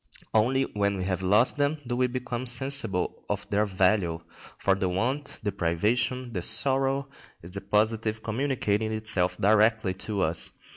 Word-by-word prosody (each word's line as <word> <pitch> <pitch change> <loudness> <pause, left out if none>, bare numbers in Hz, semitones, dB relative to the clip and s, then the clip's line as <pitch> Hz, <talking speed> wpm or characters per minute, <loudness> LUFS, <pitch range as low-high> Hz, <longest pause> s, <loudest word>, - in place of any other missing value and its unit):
Only 125 +5 +3
when 100 -4 -1
we 95 - -3
have 95 -1 -2
lost 105 +9 +3
them 145 +2 +1
do 120 0 -2
we 125 0 +2
become 125 0 -4
sensible 120 -7 +1
of 100 0 -3
their 105 +1 +2
value; 95 -3 +1 0.4
for 100 - +2
the 95 -1 -1
want, 130 +10 -2
the 105 - -1
privation, 115 +9 -1
the 90 - -2
sorrow, 135 +6 +3 0.4
is 85 +2 -10
the 100 - -4
positive, 110 +2 0
communicating 110 -3 -1
itself 105 -5 0
directly 110 -1 +3
to 95 +1 -3
us. 80 +1 0
110 Hz, 155 wpm, -27 LUFS, 95-125 Hz, 0.4 s, Only